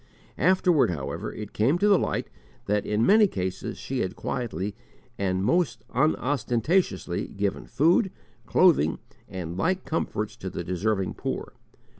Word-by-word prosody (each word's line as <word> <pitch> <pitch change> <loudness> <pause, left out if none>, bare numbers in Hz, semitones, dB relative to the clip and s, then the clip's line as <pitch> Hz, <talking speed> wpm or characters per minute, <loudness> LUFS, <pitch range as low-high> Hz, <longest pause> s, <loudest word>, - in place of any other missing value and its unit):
Afterward, 180 - +4
however, 80 +4 -4
it 105 -1 -8
came 130 +10 +2
to 205 - +2
the 200 -3 +5
light - - -1 0.4
that 105 0 0
in 105 +2 +2
many 210 +1 +6
cases 95 - -4
she 135 -1 -4
had 95 -2 -2
quietly 105 - -3 0.5
and 95 -1 0
most 170 +4 +1
unostentatiously 135 - +1
given 100 0 -3
food, 175 - +3 0.4
clothing, 155 - +4 0.3
and 85 -2 -5
like 185 - 0
comforts 110 -9 -2
to 95 - -5
the 85 - -5
deserving 95 +2 -1
poor. - - -4
110 Hz, 135 wpm, -26 LUFS, -, 0.5 s, many